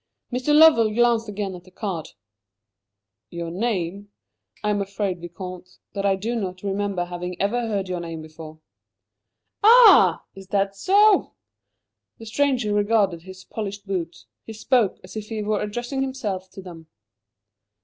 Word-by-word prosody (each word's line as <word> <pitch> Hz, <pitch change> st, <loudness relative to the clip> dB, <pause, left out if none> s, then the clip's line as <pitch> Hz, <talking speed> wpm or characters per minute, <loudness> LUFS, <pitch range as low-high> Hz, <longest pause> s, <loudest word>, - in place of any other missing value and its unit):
Mr. 255 Hz, +4 st, 0 dB
Lovell 295 Hz, -8 st, +6 dB
glanced 235 Hz, -2 st, +2 dB
again 200 Hz, -1 st, -4 dB
at 180 Hz, -1 st, -10 dB
the 185 Hz, -, -18 dB
card. 185 Hz, -5 st, -5 dB, 1.2 s
"Your 170 Hz, -1 st, -5 dB
name? 200 Hz, -1 st, -3 dB, 0.5 s
I 210 Hz, -, +1 dB
am 205 Hz, -1 st, 0 dB
afraid, 195 Hz, -2 st, -3 dB
Vicomte, 180 Hz, +1 st, -9 dB, 0.2 s
that 200 Hz, 0 st, -1 dB
I 195 Hz, -, +3 dB
do 215 Hz, +5 st, -3 dB
not 185 Hz, -4 st, -4 dB
remember 200 Hz, -2 st, -2 dB
having 180 Hz, 0 st, -6 dB
ever 230 Hz, +4 st, 0 dB
heard 200 Hz, -3 st, -2 dB
your 180 Hz, -1 st, -3 dB
name 165 Hz, -2 st, -6 dB
before." 155 Hz, 0 st, -11 dB, 1.0 s
"Ah! 470 Hz, +3 st, +7 dB
Is 195 Hz, -1 st, -12 dB
that 195 Hz, 0 st, 0 dB
so?" 400 Hz, -, +4 dB, 0.8 s
The 225 Hz, -, -11 dB
stranger 245 Hz, -2 st, 0 dB
regarded 205 Hz, -4 st, +1 dB
his 185 Hz, +1 st, -12 dB
polished 205 Hz, -1 st, -6 dB
boots. 180 Hz, -4 st, -4 dB, 0.2 s
He 225 Hz, -, -9 dB
spoke 220 Hz, -1 st, +1 dB
as -, -, -12 dB
if 215 Hz, -1 st, -6 dB
he 220 Hz, -2 st, -3 dB
were 210 Hz, 0 st, -1 dB
addressing 240 Hz, +6 st, -3 dB
himself 210 Hz, -9 st, -4 dB
to 195 Hz, -, -10 dB
them. 165 Hz, -3 st, -11 dB
200 Hz, 150 wpm, -23 LUFS, 185-225 Hz, 1.2 s, Ah